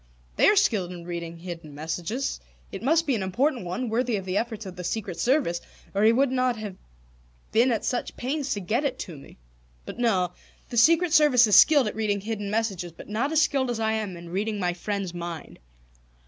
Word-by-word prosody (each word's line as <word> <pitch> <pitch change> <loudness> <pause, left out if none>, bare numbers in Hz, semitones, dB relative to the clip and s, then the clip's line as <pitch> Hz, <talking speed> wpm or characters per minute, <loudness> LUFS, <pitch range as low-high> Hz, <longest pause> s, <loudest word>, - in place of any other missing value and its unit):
"They - - +5
are 415 - +6
skilled 215 - +2
in 175 -1 -9
reading 170 -1 -5
hidden 165 -4 -8
messages. 175 - -3 0.3
It - - -6
must 320 +6 +2
be 280 - +1
an 220 - -1
important 240 +5 0
one, 215 +9 -3
worthy 235 +1 0
of 195 -2 -4
the 185 0 -3
efforts 220 -1 -2
of 185 -2 -8
the 180 - -7
Secret 180 -1 -3
Service, 245 - +1 0.3
or 200 - 0
he 220 +1 +6
would 260 +3 +2
not 255 -1 +1
have 210 -3 -6 0.8
been 240 +3 +4
at 225 - -1
such 250 - -2
pains 275 +2 -2
to 205 - -4
get 215 +10 0
it 280 -3 -1
to 170 - -7
me 140 - -14 0.5
"But - - -8
no. 190 -7 +2 0.4
The 240 - -4
Secret 330 +6 +5
Service 290 -7 +6
is 210 - +4
skilled 290 -4 +7
at 210 - -3
reading 210 -2 0
hidden 210 -1 -4
messages, 200 -5 -2
but 165 - -13
not 235 +8 -1
as 320 -1 +4
skilled 270 -4 0
as 235 -2 -2
I 220 0 +1
am 215 -5 -3
in 170 0 -10
reading 205 +4 -2
my 180 -2 0
friend's 195 0 -3
mind. 170 -2 -7
215 Hz, 215 wpm, -26 LUFS, 180-255 Hz, 0.8 s, skilled